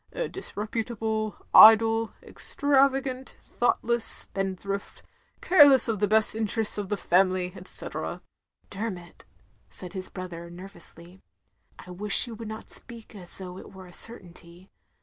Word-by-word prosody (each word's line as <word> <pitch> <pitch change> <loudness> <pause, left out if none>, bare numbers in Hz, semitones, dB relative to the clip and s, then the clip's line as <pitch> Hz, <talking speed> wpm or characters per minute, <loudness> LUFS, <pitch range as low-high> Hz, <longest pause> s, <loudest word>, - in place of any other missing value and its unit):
A - - -3
disreputable, 220 - -4 0.2
idle, 225 0 +7
extravagant, 270 -2 0
thoughtless 235 -1 -1
spendthrift, 195 -1 -2 0.4
care 350 -5 +7
less 265 -2 +6
of 220 -3 -2
the 205 - +1
best 215 +1 +3
interests 220 -1 -1
of 200 -2 -5
the 205 - -1
family, 185 0 +1
etc." 185 - -3 0.5
"Dermot," 195 -4 -7 0.4
said 180 -2 -5
his 185 -1 -6
brother, 170 -2 -8
nervously, 175 0 -12 0.6
"I 180 - -12
wish 200 +5 0
you 235 - -9
would 225 0 -8
not 220 0 -9
speak 235 -3 -8
as 185 -5 -3
though 185 -1 -8
it - - -13
were 190 -1 -12
a 175 - -15
certainty. 175 -4 -8
210 Hz, 130 wpm, -26 LUFS, 185-225 Hz, 0.6 s, idle